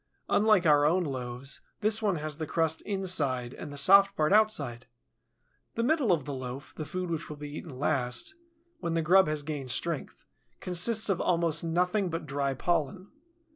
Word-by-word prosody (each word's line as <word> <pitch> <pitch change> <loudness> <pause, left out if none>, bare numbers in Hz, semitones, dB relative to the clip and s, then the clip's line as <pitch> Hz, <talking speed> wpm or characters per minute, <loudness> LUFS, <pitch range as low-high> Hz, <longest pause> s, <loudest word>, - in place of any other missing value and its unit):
Unlike 210 -3 +4
our 145 -2 +5
own 175 +5 +3
loaves, 130 -2 -6 0.2
this 215 +1 +2
one 205 -4 +1
has 155 -2 -4
the 160 -1 -4
crust 160 0 +1
inside 150 -11 -1
and 145 - -8
the 145 - -8
soft 195 +7 +6
part 155 +4 +2
outside. 145 - +1 0.9
The 230 - 0
middle 270 - +2
of 155 -6 +1
the 145 - -5
loaf, 130 +1 -7
the 155 - -5
food 180 -1 -4
which 165 0 -4
will 150 - -7
be 145 0 -8
eaten 155 -5 -8
last, 125 - -1 0.5
when 170 -1 -2
the 165 - +1
grub 185 +2 +5
has 150 -1 -2
gained 145 -3 -5
strength, 165 +4 -3 0.4
consists 185 +5 +1
of 195 -3 0
almost 165 -2 +1
nothing 180 +4 0
but 165 -1 -4
dry 140 -1 -2
pollen. 175 +5 -2
160 Hz, 175 wpm, -29 LUFS, 145-185 Hz, 0.9 s, soft